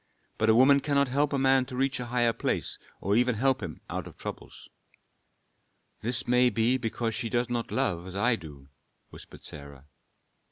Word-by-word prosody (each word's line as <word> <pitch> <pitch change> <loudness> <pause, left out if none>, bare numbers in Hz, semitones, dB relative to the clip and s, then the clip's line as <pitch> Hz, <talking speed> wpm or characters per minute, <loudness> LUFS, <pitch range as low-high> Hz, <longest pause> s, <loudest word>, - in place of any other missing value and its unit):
But 110 - +2
a 110 - +6
woman 135 +3 +6
cannot 140 -1 +1
help 145 +3 +1
a 140 - 0
man 135 -1 +3
to 130 - -7
reach 135 +1 0
a 125 - -5
higher 120 -1 +2
place - - -2 0.2
or 100 +2 +1
even 125 +1 +3
help 130 +3 +1
him 85 -6 -7
out - - -5
of - - -13
troubles." - - -8 1.3
"This 120 +1 -2
may 125 0 +4
be 115 +3 +2
because 115 -1 -2
she 115 0 -3
does 120 +1 -1
not 120 -1 -2
love 90 -10 -1
as 95 - -8
I 115 +5 +2
do," 70 -7 -12 0.4
whispered - - -13
Sarah. 70 -1 -10
120 Hz, 185 wpm, -28 LUFS, 110-130 Hz, 1.3 s, a